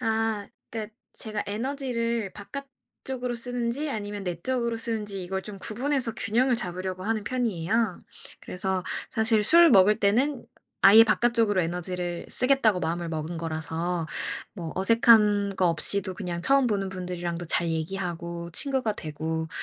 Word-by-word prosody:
아. 225 Hz, -3 st, 0 dB, 0.3 s
그니까 220 Hz, -1 st, -5 dB, 0.2 s
제가 215 Hz, -2 st, -4 dB
에너지를 235 Hz, -2 st, -2 dB
바깥쪽으로 260 Hz, +1 st, -7 dB
쓰는지 245 Hz, +4 st, -2 dB
아니면 205 Hz, -3 st, -4 dB
내 175 Hz, -3 st, -4 dB
쪽으로 235 Hz, 0 st, -1 dB
쓰는지 210 Hz, -5 st, -3 dB
이걸 190 Hz, +1 st, -3 dB
좀 205 Hz, -2 st, -7 dB
구분해서 240 Hz, +4 st, -1 dB
균형을 245 Hz, +4 st, +2 dB
잡으려고 185 Hz, -2 st, -4 dB
하는 215 Hz, 0 st, -1 dB
편이에요. 220 Hz, -4 st, -1 dB, 0.4 s
그래서 185 Hz, 0 st, -3 dB, 0.3 s
사실 220 Hz, -1 st, +2 dB
술 335 Hz, +9 st, +7 dB
먹을 205 Hz, 0 st, +6 dB
때는 245 Hz, +7 st, +1 dB, 0.4 s
아예 215 Hz, +3 st, +9 dB
'바깥쪽으로 225 Hz, -3 st, +2 dB
에너지를 175 Hz, 0 st, -3 dB
쓰겠다.'고 250 Hz, -6 st, +3 dB
마음을 170 Hz, 0 st, -2 dB
먹은 160 Hz, +1 st, -4 dB
거라서 165 Hz, +1 st, -3 dB, 0.5 s
뭐 170 Hz, -5 st, -6 dB
어색한 205 Hz, -1 st, +4 dB
거 185 Hz, -, +3 dB
없이도 185 Hz, +3 st, +1 dB
그냥 175 Hz, -3 st, -4 dB
처음 270 Hz, +2 st, +3 dB
보는 195 Hz, -2 st, -1 dB
분들이랑도 175 Hz, -2 st, -4 dB
잘 170 Hz, +1 st, +2 dB
얘기하고 170 Hz, 0 st, -4 dB
친구가 265 Hz, -1 st, 0 dB
되고 160 Hz, -2 st, -4 dB
205 Hz, 335 characters per minute, -26 LUFS, 180-235 Hz, 0.5 s, 아예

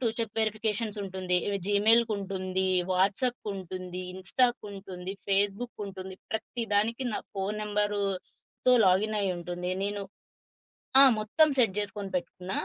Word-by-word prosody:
Two 240 Hz, -, +2 dB
step 225 Hz, -3 st, -3 dB
verifications 215 Hz, 0 st, -1 dB
ఉంటుంది. 185 Hz, -2 st, -1 dB, 0.3 s
జీమెయిల్‌కుంటుంది, 200 Hz, -3 st, +2 dB, 0.2 s
వాట్సాప్‌కుంటుంది, 190 Hz, -2 st, -1 dB
ఇన్‌స్టా‌కుంటుంది, 195 Hz, -3 st, -2 dB
ఫేస్‌బుక్‌కుంటుంది. 195 Hz, -1 st, -1 dB, 0.2 s
ప్రత్తి 225 Hz, +2 st, -3 dB
దానికి 230 Hz, +5 st, +1 dB
నా -, -, -1 dB, 0.2 s
ఫోను 195 Hz, +2 st, -2 dB
నంబర్‌తో 205 Hz, +3 st, -1 dB
లాగిన్ 205 Hz, +4 st, +3 dB
అయ్యుంటుంది. 180 Hz, -2 st, -2 dB
నేను 205 Hz, 0 st, -2 dB, 1.0 s
ఆ! -, -, +11 dB, 0.2 s
మొత్తం 230 Hz, +9 st, +4 dB
సెట్ 230 Hz, -7 st, +4 dB
చేసుకొని 205 Hz, -1 st, -4 dB
పెట్టుకున్న. 180 Hz, +1 st, -4 dB
200 Hz, 100 wpm, -29 LUFS, 190-215 Hz, 1.0 s, ఆ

